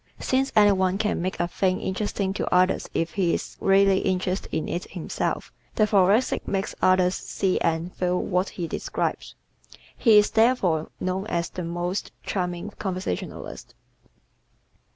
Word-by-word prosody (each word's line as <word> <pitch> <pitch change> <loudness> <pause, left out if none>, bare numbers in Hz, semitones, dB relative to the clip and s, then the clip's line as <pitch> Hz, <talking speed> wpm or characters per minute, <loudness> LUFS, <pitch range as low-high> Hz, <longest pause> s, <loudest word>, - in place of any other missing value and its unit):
Since 265 +1 0
any 205 -1 +7
one 190 -1 +1
can 210 -4 -1
make 185 +2 -3
a - - +1
thing 185 +1 0
interesting 195 0 -2
to - - -3
others 185 +1 +2
if 165 0 -2
he 180 -4 +1
is - - -6
really 195 0 +4
interested 185 +1 -1
in 155 - -2
it 175 - -4
himself, 175 -4 -3 0.2
the 215 - +4
Thoracic 205 +3 +2
makes 195 0 -2
others 185 -1 +4
see 190 -1 -1
and 165 +2 -1
feel 180 0 0
what 180 0 0
he 175 -2 -2
describes. - - -3 0.6
He 225 -4 +5
is 210 - +4
therefore 220 -9 +2
known 185 +2 -2
as 170 -4 -1
the 180 - -5
most 175 +3 -3
charming 180 +1 -3
conversationalist. 185 - -5
185 Hz, 150 wpm, -25 LUFS, 180-200 Hz, 0.6 s, any